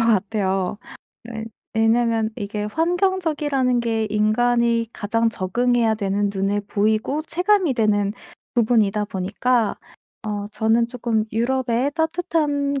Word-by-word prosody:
같아요. 200 Hz, -3 st, 0 dB, 0.5 s
왜 220 Hz, -1 st, -5 dB, 0.3 s
왜냐면 225 Hz, 0 st, +2 dB
이게 210 Hz, -2 st, -4 dB
환경적이라는 310 Hz, -, 0 dB
게 225 Hz, -2 st, -1 dB
인간이 235 Hz, +2 st, +2 dB
가장 230 Hz, +2 st, 0 dB
적응해야 230 Hz, +3 st, +1 dB
되는 200 Hz, -1 st, -1 dB
눈에 195 Hz, +1 st, 0 dB
보이고 215 Hz, +7 st, 0 dB
체감이 360 Hz, -2 st, +1 dB
되는 205 Hz, -3 st, +1 dB, 0.4 s
부분이다 215 Hz, -3 st, +2 dB
보니까 205 Hz, +4 st, 0 dB, 0.5 s
어 205 Hz, -1 st, -3 dB
저는 225 Hz, +2 st, +2 dB
쪼끔 235 Hz, -3 st, -1 dB
유럽의 250 Hz, +3 st, 0 dB
따뜻한 310 Hz, -4 st, 0 dB
230 Hz, 260 characters per minute, -22 LUFS, 210-255 Hz, 0.5 s, 왜냐면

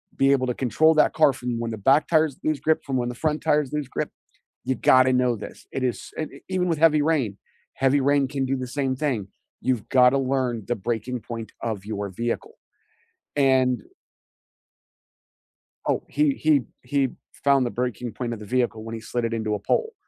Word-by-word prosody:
be 135 Hz, 0 st, +3 dB
able 130 Hz, -2 st, +2 dB
to 125 Hz, -, -1 dB
control 155 Hz, +6 st, +3 dB
that 155 Hz, -, +4 dB
car 155 Hz, -3 st, +5 dB
from 125 Hz, -2 st, -4 dB
when 115 Hz, -, -2 dB
the 110 Hz, -, -4 dB
back 135 Hz, +8 st, +3 dB
tires 155 Hz, -4 st, +2 dB
lose 155 Hz, -2 st, 0 dB
grip, 160 Hz, 0 st, +1 dB
from 135 Hz, -2 st, -2 dB
when 120 Hz, -1 st, -1 dB
the 125 Hz, -, -6 dB
front 155 Hz, +3 st, -1 dB
tires 150 Hz, -3 st, +2 dB
lose 150 Hz, -3 st, -2 dB
grip. -, -, -3 dB, 0.5 s
You 130 Hz, -, 0 dB
gotta 130 Hz, +1 st, +5 dB
know 125 Hz, -1 st, +2 dB
this, 105 Hz, -, -10 dB
it 130 Hz, -, -3 dB
is 125 Hz, -2 st, -2 dB
s 155 Hz, -, -1 dB
eh, -, -, -12 dB
even 185 Hz, -1 st, 0 dB
with 165 Hz, -3 st, 0 dB
heavy 155 Hz, -2 st, +5 dB
rain, 135 Hz, -11 st, 0 dB, 0.4 s
heavy 135 Hz, +1 st, +2 dB
rain 140 Hz, 0 st, +3 dB
can 135 Hz, -1 st, -2 dB
do 135 Hz, +1 st, -1 dB
the 130 Hz, -, -4 dB
same 135 Hz, 0 st, -1 dB
thing, 125 Hz, -9 st, -1 dB, 0.3 s
you've 125 Hz, -4 st, -1 dB
gotta 125 Hz, 0 st, +5 dB
learn 130 Hz, -4 st, -1 dB
the 120 Hz, -, +1 dB
breaking 120 Hz, +4 st, -3 dB
point 115 Hz, -1 st, -7 dB
of 110 Hz, -4 st, -3 dB
your 100 Hz, -2 st, -4 dB
vehicle." 120 Hz, -, -4 dB, 0.8 s
And 130 Hz, -3 st, +3 dB, 2.1 s
Oh, -, -, +1 dB
he 300 Hz, -2 st, +2 dB
he 155 Hz, -, +3 dB, 0.2 s
he 135 Hz, 0 st, +1 dB, 0.3 s
found 140 Hz, -2 st, +4 dB
the -, -, -1 dB
breaking 125 Hz, -2 st, -3 dB
point 120 Hz, -2 st, -3 dB
of 110 Hz, -, -7 dB
the 105 Hz, -, -9 dB
vehicle 120 Hz, -1 st, 0 dB
when 115 Hz, 0 st, -6 dB
he 115 Hz, -, -7 dB
slid 115 Hz, +2 st, -2 dB
it 115 Hz, -, -2 dB
into 110 Hz, -2 st, -1 dB
a -, -, -4 dB
pole. 450 Hz, -, 0 dB
130 Hz, 200 wpm, -24 LUFS, 120-145 Hz, 2.1 s, car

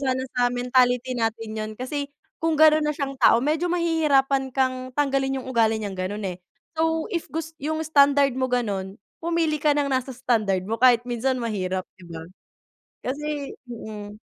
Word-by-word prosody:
sana 260 Hz, -2 st, 0 dB
sa 245 Hz, 0 st, +3 dB
mentality 250 Hz, 0 st, +2 dB
natin 225 Hz, -1 st, -2 dB
yun 215 Hz, 0 st, -3 dB
kasi 280 Hz, +3 st, -3 dB, 0.3 s
kung 325 Hz, -1 st, +2 dB
gano'n 310 Hz, 0 st, +6 dB
na 300 Hz, -, +1 dB
siyang 280 Hz, -2 st, -3 dB
tao, 230 Hz, -, +6 dB
medyo 310 Hz, +4 st, 0 dB
mahihirapan 285 Hz, -6 st, +2 dB
kang 255 Hz, -1 st, -1 dB
tanggalin 270 Hz, -2 st, +1 dB
yung 260 Hz, -, -10 dB
ugali 225 Hz, -3 st, +2 dB
niyang 200 Hz, -3 st, -5 dB
gano'n, 205 Hz, +3 st, -3 dB
eh. -, -, -31 dB, 0.4 s
So 320 Hz, 0 st, +1 dB
if 340 Hz, -, -2 dB
gus 320 Hz, +1 st, -4 dB
yung 310 Hz, +3 st, -2 dB
standard 280 Hz, -2 st, +4 dB
mo 260 Hz, 0 st, 0 dB
gano'n, 200 Hz, -6 st, -2 dB, 0.3 s
pumili 330 Hz, -2 st, 0 dB
ka 300 Hz, -, +4 dB
ng 285 Hz, -1 st, +1 dB
nasa 260 Hz, 0 st, -1 dB
standard 215 Hz, -7 st, 0 dB
mo 225 Hz, +4 st, -3 dB
kahit 245 Hz, -2 st, +5 dB
minsan 250 Hz, +2 st, 0 dB
mahirap, 190 Hz, -5 st, -2 dB, 0.2 s
di -, -, -13 dB
ba? 160 Hz, -1 st, -7 dB, 0.8 s
Kasi 290 Hz, +1 st, -3 dB, 0.2 s
mm. 215 Hz, -3 st, -8 dB
260 Hz, 165 wpm, -24 LUFS, 225-290 Hz, 0.8 s, gano'n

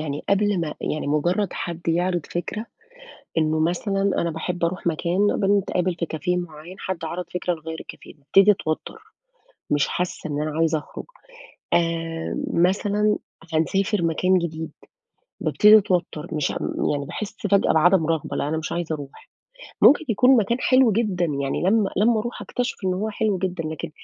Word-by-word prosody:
يعني 145 Hz, -2 st, -4 dB
قبل 200 Hz, -1 st, +2 dB
ما 155 Hz, -3 st, -3 dB
يعني 150 Hz, -, -2 dB
مجرد 175 Hz, +7 st, 0 dB
حد 170 Hz, -1 st, -5 dB
يعرض 175 Hz, 0 st, 0 dB
فكرة 215 Hz, +6 st, -4 dB, 0.7 s
إنه 155 Hz, 0 st, +2 dB
مثلًا 180 Hz, +5 st, 0 dB, 0.2 s
أنا 170 Hz, -1 st, 0 dB
باحب 175 Hz, +2 st, -4 dB
أروح 175 Hz, 0 st, -3 dB
مكان، 175 Hz, +5 st, +1 dB
بنتقابل 195 Hz, -3 st, +1 dB
في 170 Hz, -, -2 dB
cafe 180 Hz, +3 st, -1 dB
معين، 160 Hz, +6 st, -12 dB
حد 185 Hz, -4 st, -4 dB
عَرَض 175 Hz, +3 st, -4 dB
فكرة 180 Hz, 0 st, -1 dB
نغيّر 160 Hz, 0 st, -7 dB
الcafe، -, -, -12 dB
بابتدي 195 Hz, +8 st, +5 dB
أتوتر، 170 Hz, -, -3 dB, 0.7 s
مش 145 Hz, -1 st, +2 dB
حاسة 175 Hz, -3 st, -3 dB
إن 145 Hz, +1 st, -2 dB
أنا 155 Hz, 0 st, -3 dB
عايزة 165 Hz, -1 st, +2 dB
أخرج، 150 Hz, -, -9 dB, 0.7 s
آآ 165 Hz, -1 st, -1 dB, 0.2 s
مثلًا 205 Hz, +4 st, +2 dB, 0.4 s
هنسافر 195 Hz, +5 st, +1 dB
مكان 185 Hz, +3 st, +2 dB
جديد، 160 Hz, -2 st, -4 dB, 0.7 s
بابتدي 210 Hz, 0 st, +6 dB
أتوتر، 180 Hz, -6 st, -1 dB
مش 150 Hz, -3 st, 0 dB
أم -, -, -2 dB
يعني 145 Hz, -1 st, -2 dB
باحس 205 Hz, +5 st, -6 dB
فجأة 200 Hz, 0 st, +3 dB
بعدم 165 Hz, +1 st, +4 dB
رغبة، 160 Hz, -3 st, -1 dB
لا -, -, -1 dB
أنا 160 Hz, +1 st, -1 dB
مش 155 Hz, -, -5 dB
عايزة 170 Hz, -2 st, -2 dB
أروح. 145 Hz, -2 st, -10 dB, 0.5 s
ممكن 295 Hz, -, +7 dB
يكون 250 Hz, +4 st, +5 dB
مكان 230 Hz, +2 st, +1 dB
حلو 255 Hz, -3 st, +4 dB
جدًا، 200 Hz, -5 st, 0 dB
يعني 140 Hz, -1 st, -2 dB
لمّا 200 Hz, +2 st, +2 dB
لمّا 220 Hz, +3 st, +3 dB
أروح 240 Hz, +2 st, -5 dB
أكتشف 245 Hz, +1 st, -3 dB
إن 185 Hz, -, +1 dB
هو 210 Hz, +4 st, -2 dB
حلو 210 Hz, -2 st, 0 dB
جدًا، 180 Hz, -2 st, -3 dB
لكن 155 Hz, -1 st, -5 dB
175 Hz, 160 wpm, -23 LUFS, 160-200 Hz, 0.7 s, ممكن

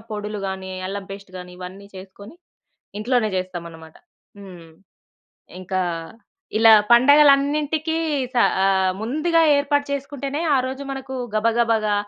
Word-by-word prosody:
పొడులు 210 Hz, 0 st, -5 dB
గానీ, 190 Hz, 0 st, -6 dB, 0.2 s
అల్లం 200 Hz, +1 st, -5 dB
పేస్ట్ 195 Hz, -1 st, -10 dB
గానీ 180 Hz, 0 st, -10 dB
ఇవన్నీ 185 Hz, +2 st, -10 dB
చేసుకొని 195 Hz, -, -12 dB, 0.7 s
ఇంట్లోనే 235 Hz, 0 st, 0 dB
చేస్తామన్నమాట. 170 Hz, -3 st, -7 dB, 0.4 s
హ్మ్. 180 Hz, -4 st, -12 dB, 0.9 s
ఇంకా 185 Hz, 0 st, -3 dB, 0.8 s
ఇలా 225 Hz, 0 st, +7 dB, 0.2 s
పండగలన్నింటికీ 290 Hz, +4 st, +4 dB, 0.4 s
స -, -, -4 dB, 0.3 s
ఆహ్, 190 Hz, -1 st, +2 dB
ముందుగా 310 Hz, +9 st, 0 dB, 0.2 s
ఏర్పాటు 285 Hz, 0 st, 0 dB
చేసుకుంటేనే 280 Hz, +1 st, -4 dB, 0.2 s
ఆరోజు 260 Hz, +1 st, -3 dB
మనకు 265 Hz, -1 st, -6 dB, 0.2 s
గబగబాగా, 225 Hz, -1 st, +1 dB
220 Hz, 105 wpm, -21 LUFS, 190-275 Hz, 0.9 s, ఇలా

